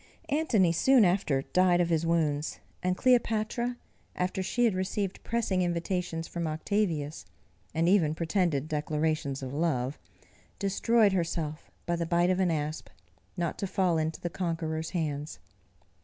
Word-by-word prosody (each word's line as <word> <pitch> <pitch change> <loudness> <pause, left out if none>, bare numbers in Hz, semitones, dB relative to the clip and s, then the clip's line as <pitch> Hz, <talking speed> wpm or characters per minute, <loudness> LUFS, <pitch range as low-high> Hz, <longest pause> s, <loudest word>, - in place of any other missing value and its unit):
Antony 255 - +3
soon 245 +6 +5
after 175 -7 +1
died 180 +1 +3
of 175 -1 +2
his 165 0 +1
wounds, 155 -3 0 0.2
and 180 0 0
Cleopatra, 240 -1 +1 0.4
after 185 +1 -1
she 240 +6 +1
had 225 - +3
received 190 +1 -2
pressing 220 -5 0
invitations 175 -1 -2
from 170 -1 -3
Octavius, 160 -2 -1 0.5
and 165 +1 +2
even 170 -5 +3
pretended 165 -4 0
declarations 150 -2 -1
of 130 0 -5
love, 145 -4 -1 0.6
destroyed 205 +1 +3
herself 165 -3 -2 0.2
by 170 - 0
the 170 -1 -2
bite 175 +1 +3
of 185 - 0
an 185 -2 +3
asp, 155 -1 -3 0.5
not 170 -2 -2
to 200 - -1
fall 180 -4 +1
into 160 0 -2
the 175 - -4
conqueror's 160 -3 -2
hands. 150 -3 -3
170 Hz, 140 wpm, -29 LUFS, 155-190 Hz, 0.6 s, soon